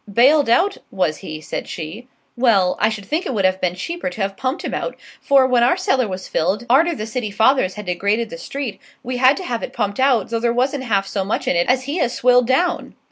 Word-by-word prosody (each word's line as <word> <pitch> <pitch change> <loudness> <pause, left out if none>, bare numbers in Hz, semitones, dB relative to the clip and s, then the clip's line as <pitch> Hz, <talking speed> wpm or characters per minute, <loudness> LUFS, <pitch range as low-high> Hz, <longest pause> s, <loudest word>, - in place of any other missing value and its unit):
"Bailed 270 +5 +4
out, 370 - +3
was 175 -5 -1
he?" 155 0 -8
said - - -5
she; 170 +10 -7 0.3
"well, 215 -8 +3
I 215 - +3
should 215 -3 -6
think 310 - -2
it 260 - -3
would 195 -2 +1
have 185 0 +1
been 180 -1 0
cheaper 335 - -4
to 220 - -7
have 195 0 -2
pumped 260 - -3
him - - -4
out, - - -3 0.3
for, 275 -2 +4
when 250 -2 +2
our 245 +9 +3
cellar 265 - +1
was 185 -1 -6
filled, 190 +8 -1
arter 325 +7 +3
the 215 - -5
city 225 -1 -4
fathers 220 -1 +2
had 210 -1 -7
degraded 200 +6 -1
the 250 - -7
street, 275 -6 -6 0.2
we 250 0 -3
had 260 +3 +4
to 375 - -5
have 240 -9 -3
it - - -6
pumped 205 -1 -2
out, 255 -6 +2
though 230 - 0
there 235 0 +1
wasn't 260 +3 -1
half 200 -4 +1
so 195 0 -2
much 195 - -3
in - - +2
it 170 0 +1
as 255 +1 +2
he 285 +6 -3
has 245 -4 0
swilled 250 -1 +3
down." 345 +7 0
235 Hz, 245 wpm, -20 LUFS, 195-265 Hz, 0.3 s, Bailed